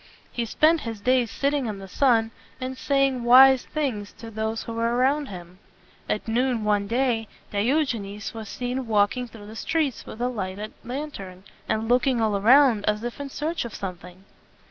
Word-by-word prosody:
He 235 Hz, -, -2 dB
spent 310 Hz, +7 st, +3 dB
his 225 Hz, -2 st, -5 dB
days 250 Hz, +2 st, +2 dB
sitting 280 Hz, 0 st, 0 dB
in 210 Hz, -2 st, -4 dB
the 195 Hz, 0 st, -9 dB
sun, 225 Hz, 0 st, +2 dB, 0.3 s
and 260 Hz, 0 st, -4 dB
saying 275 Hz, -2 st, +1 dB
wise 260 Hz, +2 st, +7 dB
things 245 Hz, -10 st, -3 dB
to 230 Hz, -1 st, -10 dB
those 220 Hz, +1 st, -3 dB
who 230 Hz, -, -6 dB
were 230 Hz, +1 st, 0 dB
around 275 Hz, +4 st, +2 dB
him. 180 Hz, -1 st, -10 dB, 0.5 s
At 210 Hz, -, -2 dB
noon 240 Hz, 0 st, 0 dB
one 205 Hz, -1 st, +1 dB
day, 235 Hz, -1 st, 0 dB, 0.2 s
Di 205 Hz, +4 st, +1 dB
og 300 Hz, -3 st, +2 dB
e 230 Hz, -, -4 dB
nes 200 Hz, +1 st, -7 dB
was 220 Hz, -2 st, -7 dB
seen 250 Hz, 0 st, -3 dB
walking 215 Hz, +3 st, +1 dB
through 225 Hz, -3 st, -12 dB
the 215 Hz, +2 st, -10 dB
streets 300 Hz, 0 st, -1 dB
with 220 Hz, -, -9 dB
a 245 Hz, -, 0 dB
lighted 205 Hz, -3 st, -5 dB
lantern, 230 Hz, -9 st, -6 dB, 0.3 s
and 220 Hz, +1 st, 0 dB
looking 245 Hz, +1 st, +2 dB
all 220 Hz, -2 st, +1 dB
around 235 Hz, +1 st, +5 dB
as 210 Hz, +1 st, 0 dB
if 240 Hz, +2 st, -5 dB
in 285 Hz, -1 st, -5 dB
search 315 Hz, +5 st, -3 dB
of 235 Hz, -3 st, -7 dB
something. 180 Hz, -1 st, -8 dB
230 Hz, 190 wpm, -25 LUFS, 210-260 Hz, 0.5 s, wise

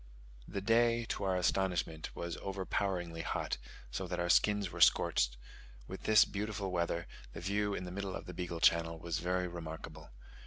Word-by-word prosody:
The 100 Hz, -, -4 dB
day 115 Hz, +2 st, +3 dB
to 100 Hz, -, -2 dB
our 95 Hz, -1 st, +2 dB
astonishment 90 Hz, -4 st, 0 dB
was 85 Hz, -1 st, -4 dB
overpoweringly 95 Hz, -3 st, -2 dB
hot, -, -, -2 dB, 0.3 s
so -, -, -3 dB
that -, -, -3 dB
our 85 Hz, 0 st, 0 dB
skins 105 Hz, 0 st, +3 dB
were -, -, -6 dB
scorched: -, -, +4 dB, 0.5 s
with 95 Hz, -, -8 dB
this 110 Hz, -1 st, +7 dB
beautiful 105 Hz, -1 st, -3 dB
weather, 85 Hz, -1 st, 0 dB, 0.3 s
the -, -, -6 dB
view 100 Hz, +2 st, 0 dB
in 90 Hz, -, -4 dB
the 90 Hz, -, -6 dB
middle 100 Hz, 0 st, -3 dB
of -, -, -6 dB
the 90 Hz, -, -7 dB
Beagle 85 Hz, -1 st, -4 dB
Channel 85 Hz, 0 st, +4 dB
was 85 Hz, 0 st, -3 dB
very 90 Hz, +1 st, 0 dB
remarkable. 80 Hz, -2 st, -8 dB
90 Hz, 170 wpm, -34 LUFS, 85-100 Hz, 0.5 s, this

